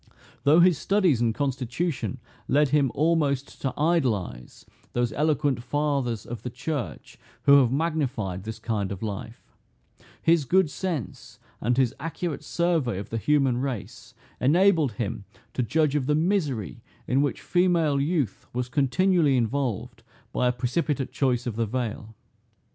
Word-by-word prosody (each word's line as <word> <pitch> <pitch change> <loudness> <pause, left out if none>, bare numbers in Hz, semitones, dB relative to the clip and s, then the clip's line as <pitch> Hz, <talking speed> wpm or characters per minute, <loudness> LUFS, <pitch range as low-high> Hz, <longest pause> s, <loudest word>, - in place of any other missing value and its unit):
Though 155 +4 +6
his 175 -3 +4
studies 185 - +2
and 115 -1 +3
constitution 140 +3 -2 0.3
led 145 +1 +3
him 140 -3 +2
almost 145 -3 0
to 135 - 0
idolize 130 - -1 0.3
those 120 -2 0
eloquent 145 -2 +1
fathers 135 -4 -1
of 120 -3 -6
the 125 - -4
church 125 - -5 0.2
who 140 0 +7
have 125 -3 +3
magnified 135 - -1
this 110 +1 -6
kind 105 -3 -2
of 100 +2 -5
life, 110 +2 -7 0.7
his 165 -2 +3
good 180 0 +3
sense 160 - -5 0.2
and 120 +2 +1
his 130 -3 +2
accurate 165 0 -4
survey 165 - 0
of 100 - -7
the 115 - -1
human 135 +1 +2
race, 130 -5 -5 0.2
enabled 160 - +3
him 105 -1 -4 0.3
to - - -1
judge 150 +4 +1
of 145 -3 0
the 150 - +3
misery 155 - -1 0.2
in 130 +2 +2
which 145 - -1
female 170 -6 +2
youth 145 - -1
was 125 0 -2
continually 150 +2 +2
involved 120 -1 -2 0.3
by 125 - +2
a - - +3
precipitate 130 +3 -1
choice 125 -3 0
of 120 -4 -3
the 115 -1 0
veil. 110 -2 -4
135 Hz, 145 wpm, -26 LUFS, 120-155 Hz, 0.7 s, who